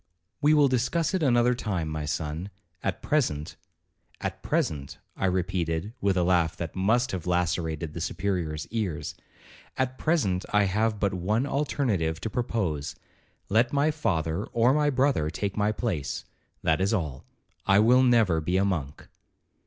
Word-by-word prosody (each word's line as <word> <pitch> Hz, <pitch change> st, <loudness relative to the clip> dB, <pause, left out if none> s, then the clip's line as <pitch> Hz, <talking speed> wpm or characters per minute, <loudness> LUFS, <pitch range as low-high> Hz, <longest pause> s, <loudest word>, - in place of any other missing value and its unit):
'We 150 Hz, +1 st, +5 dB
will 145 Hz, -2 st, +6 dB
discuss 145 Hz, +7 st, 0 dB
it 190 Hz, -, +1 dB
another 125 Hz, -3 st, +4 dB
time, 95 Hz, -9 st, -2 dB
my 80 Hz, -1 st, -3 dB
son; 80 Hz, +3 st, -3 dB, 0.3 s
at 100 Hz, -, -3 dB
present—' 75 Hz, -, 0 dB, 0.6 s
'At -, -, -4 dB
present,' 70 Hz, -3 st, -1 dB, 0.2 s
I 95 Hz, -, 0 dB
repeated 90 Hz, 0 st, -1 dB
with 100 Hz, -2 st, +2 dB
a 90 Hz, -, +3 dB
laugh 85 Hz, -2 st, +2 dB
that 80 Hz, -2 st, -5 dB
must 115 Hz, +7 st, +2 dB
have 90 Hz, -3 st, -4 dB
lacerated 85 Hz, -3 st, -1 dB
the 85 Hz, -, -5 dB
Superior's 85 Hz, -5 st, -2 dB
ears—'At 115 Hz, -, -5 dB
present 105 Hz, -, +1 dB
I 105 Hz, 0 st, +4 dB
have 105 Hz, +2 st, +1 dB
but 100 Hz, -1 st, +1 dB
one 105 Hz, +8 st, 0 dB
alternative 120 Hz, -, 0 dB
to 110 Hz, -, -3 dB
propose—let 110 Hz, -, -2 dB
my 145 Hz, +2 st, +3 dB
father 85 Hz, -, -1 dB
or 120 Hz, +3 st, +3 dB
my 150 Hz, 0 st, +3 dB
brother 130 Hz, -, +2 dB
take 100 Hz, +5 st, -3 dB
my 105 Hz, 0 st, +2 dB
place—that 85 Hz, -, -3 dB
is 100 Hz, +4 st, +2 dB
all. 75 Hz, -, -3 dB, 0.4 s
I 95 Hz, -, +5 dB
will 120 Hz, +5 st, +6 dB
never 115 Hz, -10 st, +4 dB
be 90 Hz, +4 st, 0 dB
a 95 Hz, -, +3 dB
monk.' 80 Hz, -8 st, -3 dB
95 Hz, 145 wpm, -27 LUFS, 80-120 Hz, 0.6 s, will